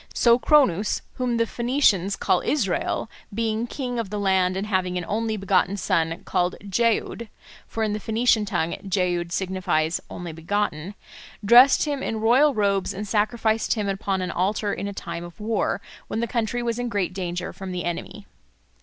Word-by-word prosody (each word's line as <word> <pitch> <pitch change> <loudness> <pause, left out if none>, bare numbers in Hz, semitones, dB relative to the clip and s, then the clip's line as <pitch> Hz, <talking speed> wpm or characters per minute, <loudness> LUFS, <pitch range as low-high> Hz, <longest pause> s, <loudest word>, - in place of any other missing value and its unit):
So 235 0 +5
Cronus, 235 - +3
whom 245 -2 0
the 230 - +2
Phoenicians 235 -6 +1
call 180 - +1
Israel, 225 -6 -1 0.2
being 225 +2 -1
king 245 -2 -4
of 225 -4 -3
the 210 - -4
land 190 -2 +2
and 195 - -2
having 185 -3 0
an 175 - -3
only 220 +1 -1
begotten 195 0 +1
son 165 -4 0
called 180 -1 0
Jeoud 230 +1 0 0.4
(for 225 - -3
in 215 -1 0
the 210 - -2
Phoenician 220 +1 +2
tongue 170 -4 -1
Jeoud 175 -2 0
signifies 180 -4 0
'only 175 -1 -6
begotten'), 170 +1 -2 0.5
dressed 245 +8 +7
him 290 -2 -2
in 225 -3 -2
royal 255 +6 +4
robes 200 -2 +1
and 210 +2 -5
sacrificed 220 +2 +1
him 210 -2 -2
upon 195 -1 -1
an 180 - -3
altar 200 +3 0
in 200 - -4
a - - -3
time 170 -3 -6
of 175 +4 -11
war, 210 -1 -1 0.3
when 220 - -3
the 235 - +1
country 235 +1 -2
was 235 0 -1
in 245 0 -2
great 200 -5 -1
danger 180 -1 -4
from 190 -1 -7
the 180 -1 -3
enemy." 175 -1 -5
205 Hz, 175 wpm, -24 LUFS, 185-230 Hz, 0.5 s, dressed